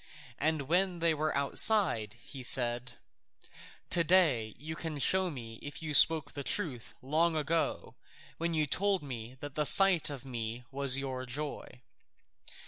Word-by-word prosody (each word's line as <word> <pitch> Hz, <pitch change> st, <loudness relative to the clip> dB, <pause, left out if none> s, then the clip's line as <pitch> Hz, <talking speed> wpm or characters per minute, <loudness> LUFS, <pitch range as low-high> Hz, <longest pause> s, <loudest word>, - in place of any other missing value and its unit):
And 155 Hz, 0 st, +1 dB
when 180 Hz, +5 st, +1 dB
they 165 Hz, -1 st, +1 dB
were 155 Hz, -1 st, -1 dB
outside 140 Hz, -, +3 dB
he 130 Hz, +3 st, -10 dB
said, 120 Hz, 0 st, +1 dB, 1.0 s
"To 170 Hz, -, +3 dB
day 150 Hz, -, +2 dB
you 160 Hz, +2 st, -7 dB
can 160 Hz, -1 st, -5 dB
show 185 Hz, +6 st, +2 dB
me 115 Hz, -7 st, -9 dB
if 145 Hz, +2 st, -8 dB
you 155 Hz, -1 st, -4 dB
spoke 155 Hz, 0 st, +5 dB
truth 135 Hz, -, -3 dB
long 160 Hz, +5 st, +1 dB
ago 155 Hz, +2 st, -2 dB, 0.5 s
when 170 Hz, 0 st, -2 dB
you 155 Hz, -1 st, +1 dB
told 195 Hz, +4 st, 0 dB
me 125 Hz, -2 st, -8 dB
that 145 Hz, -1 st, -7 dB
the 150 Hz, -, -1 dB
sight 185 Hz, +1 st, +5 dB
of 135 Hz, -3 st, -8 dB
me 120 Hz, -1 st, -5 dB
was 135 Hz, -1 st, +2 dB
your 130 Hz, -2 st, -5 dB
joy." 130 Hz, -1 st, -7 dB
145 Hz, 145 wpm, -31 LUFS, 130-165 Hz, 1.0 s, spoke